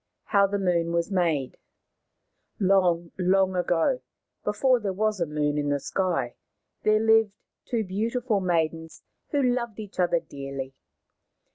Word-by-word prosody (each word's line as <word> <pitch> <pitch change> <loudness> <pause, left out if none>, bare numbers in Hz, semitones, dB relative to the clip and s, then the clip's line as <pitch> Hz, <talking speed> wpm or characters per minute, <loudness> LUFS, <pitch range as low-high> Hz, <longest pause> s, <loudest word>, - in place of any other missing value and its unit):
HOW 200 -1 +3
THE 200 +1 -1
MOON 170 -3 0
WAS 170 +3 0
MADE 165 -8 0 1.0
Long, 180 -4 +2
long 190 +1 +2
ago, 180 +8 +1 0.4
before 250 +5 +2
there 200 -4 -2
was 215 +1 0
a 170 - 0
moon 150 0 0
in 145 0 -1
the 145 0 +1
sky, 185 +4 -1 0.5
there 215 0 +3
lived 220 -2 +4 0.3
two 230 -2 -1
beautiful 220 +3 -1
maidens 165 -3 -1 0.3
who 285 -3 +1
loved 245 -3 -1
each 210 -3 -9
other 175 -1 +3
dearly. 135 -4 -7
185 Hz, 135 wpm, -26 LUFS, 165-215 Hz, 1.0 s, lived